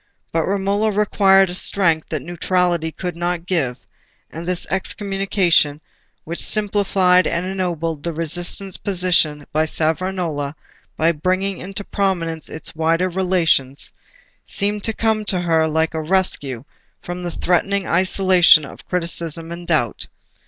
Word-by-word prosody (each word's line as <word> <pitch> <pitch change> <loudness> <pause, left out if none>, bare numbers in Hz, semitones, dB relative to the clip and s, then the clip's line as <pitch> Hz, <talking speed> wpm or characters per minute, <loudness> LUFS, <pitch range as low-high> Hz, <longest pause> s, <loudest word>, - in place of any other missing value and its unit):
But 165 -1 0
Romola 200 +2 +1
required 195 -2 +4
a - - -4
strength 170 -4 +2
that 155 -5 -3
neutrality 175 -1 0
could 180 +1 -5
not 175 0 -2
give; 150 -10 0 0.5
and 165 +2 -7
this 180 -1 -1
Excommunication, 190 -6 +1 0.4
which 170 +2 -5
simplified 195 -3 +3
and 170 +2 -1
ennobled 170 -5 -2
the 170 - -3
resistant 175 +4 -2
position 175 -6 +1
of 155 +1 +1
Savonarola 160 -3 -1 0.4
by 165 +1 +3
bringing 185 +4 -1
into 195 +2 -5
prominence 175 -6 -2
its 155 - -7
wider 165 +3 +1
relations, 170 -7 +1 0.5
seemed 205 +1 -1
to 225 - 0
come 220 -1 0
to 185 -3 +1
her 165 -2 +2
like 160 +1 0
a 160 - -2
rescue 155 -8 0 0.4
from 175 0 -6
the 175 - -3
threatening 190 +3 0
isolation 185 -3 +5
of - - -12
criticism 170 -2 -1
and 170 0 -7
doubt. 150 -10 0
175 Hz, 130 wpm, -20 LUFS, 160-190 Hz, 0.5 s, isolation